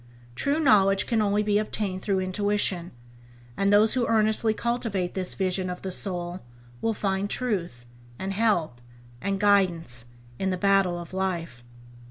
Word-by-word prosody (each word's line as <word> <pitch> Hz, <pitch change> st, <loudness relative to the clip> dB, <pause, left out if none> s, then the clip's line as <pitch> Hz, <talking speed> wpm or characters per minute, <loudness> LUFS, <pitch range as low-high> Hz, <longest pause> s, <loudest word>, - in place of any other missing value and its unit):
True 280 Hz, -, 0 dB
knowledge 195 Hz, -9 st, +4 dB
can 230 Hz, -3 st, +1 dB
only 205 Hz, 0 st, +1 dB
be 205 Hz, 0 st, +2 dB
obtained 205 Hz, -3 st, -3 dB
through 195 Hz, -1 st, 0 dB
intuition, 185 Hz, -2 st, 0 dB, 0.7 s
and 200 Hz, 0 st, +1 dB
those 210 Hz, +2 st, +5 dB
who 250 Hz, -2 st, +1 dB
earnestly 220 Hz, 0 st, +3 dB
cultivate 220 Hz, -5 st, -2 dB
this 185 Hz, -1 st, -3 dB
vision 185 Hz, -1 st, -1 dB
of 180 Hz, 0 st, -6 dB
the 190 Hz, -, -3 dB
soul 180 Hz, -1 st, -2 dB, 0.4 s
will 225 Hz, -1 st, 0 dB
find 195 Hz, 0 st, -1 dB
truth, 175 Hz, -, -2 dB, 0.3 s
and 195 Hz, +1 st, -4 dB
help, 175 Hz, -, 0 dB, 0.4 s
and 195 Hz, +1 st, -1 dB
guidance, 175 Hz, -, +2 dB, 0.3 s
in 190 Hz, -, 0 dB
the 185 Hz, -, -1 dB
battle 195 Hz, -2 st, +2 dB
of 175 Hz, +1 st, -9 dB
life. 170 Hz, -9 st, -3 dB
195 Hz, 150 wpm, -26 LUFS, 180-210 Hz, 0.7 s, those